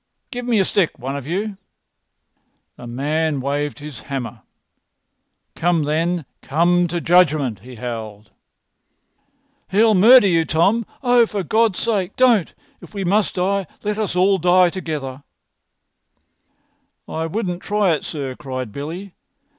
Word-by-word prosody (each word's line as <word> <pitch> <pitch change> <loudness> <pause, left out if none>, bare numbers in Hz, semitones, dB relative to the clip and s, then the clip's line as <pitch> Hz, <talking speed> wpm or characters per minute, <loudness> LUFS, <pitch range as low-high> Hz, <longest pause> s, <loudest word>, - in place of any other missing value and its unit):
Give 245 -1 -5
me 235 -2 +2
a 190 - +3
stick, 185 -4 0
one 135 +3 -5
of 140 -1 -6
you." 200 +4 -3 1.2
The 120 - -10
man 150 +4 -1
waved 145 +2 -2
his 145 -5 -9
hammer. 125 -4 -6 1.1
"Come, 170 -2 +1
then! 165 +2 -1 0.2
Come 175 +4 +2
to 175 +1 -2
judgment!" 155 - +3
he 125 0 -12
howled. 110 -3 -7 1.4
"He'll 215 +3 +4
murder 225 +5 +7
you, 165 -4 +3
Tom! 195 +9 +1 0.2
Oh, 245 -2 +4
for 205 -3 -3
God's 220 +2 +2
sake, 205 -6 -1
don't! 240 -9 +3 0.3
If - - -14
we 200 - -2
must 200 +3 +1
die, 195 0 0 0.2
let 210 +1 -2
us 210 -5 -1
die 180 -1 +4
together." 150 -7 -5 1.9
"I 160 +1 -3
wouldn't 180 -1 -3
try 205 -3 +1
it, 155 - -1
sir," 140 -4 -5
cried 130 -4 -6
Billy. 170 - -7
175 Hz, 130 wpm, -20 LUFS, 145-200 Hz, 1.9 s, murder